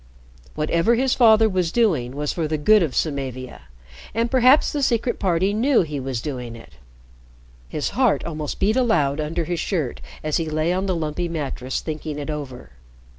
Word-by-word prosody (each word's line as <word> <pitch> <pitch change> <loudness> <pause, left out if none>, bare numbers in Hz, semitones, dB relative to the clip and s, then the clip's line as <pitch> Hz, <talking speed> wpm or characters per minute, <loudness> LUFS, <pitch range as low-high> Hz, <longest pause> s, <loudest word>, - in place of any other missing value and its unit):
Whatever 170 +9 +2
his 260 +2 +1
father 225 -2 +5
was 185 -5 0
doing 160 - +1
was 150 0 -2
for 165 -3 -2
the 155 0 -1
good 210 +8 +5
of 155 -7 -1
Samavia, 130 -4 -3 0.5
and 230 +1 0
perhaps 260 +2 +5
the 295 - -2
Secret 240 -2 0
Party 185 +1 +1
knew 240 +1 +3
he 150 -3 -5
was 130 -3 -3
doing 125 -5 -5
it. 115 - -14 1.0
His 150 - -2
heart 255 -3 +1
almost 155 -3 -5
beat 210 +3 +2
aloud 165 - +2
under 160 +3 -2
his 175 +1 -2
shirt 155 -10 -2 0.2
as 155 -1 0
he 165 -2 -2
lay 155 +3 0
on 190 +2 -1
the 185 - 0
lumpy 165 +2 -2
mattress 135 -5 -3
thinking 155 -1 -5
it 150 +1 -4
over. 130 - -7
165 Hz, 175 wpm, -22 LUFS, 145-215 Hz, 1.0 s, father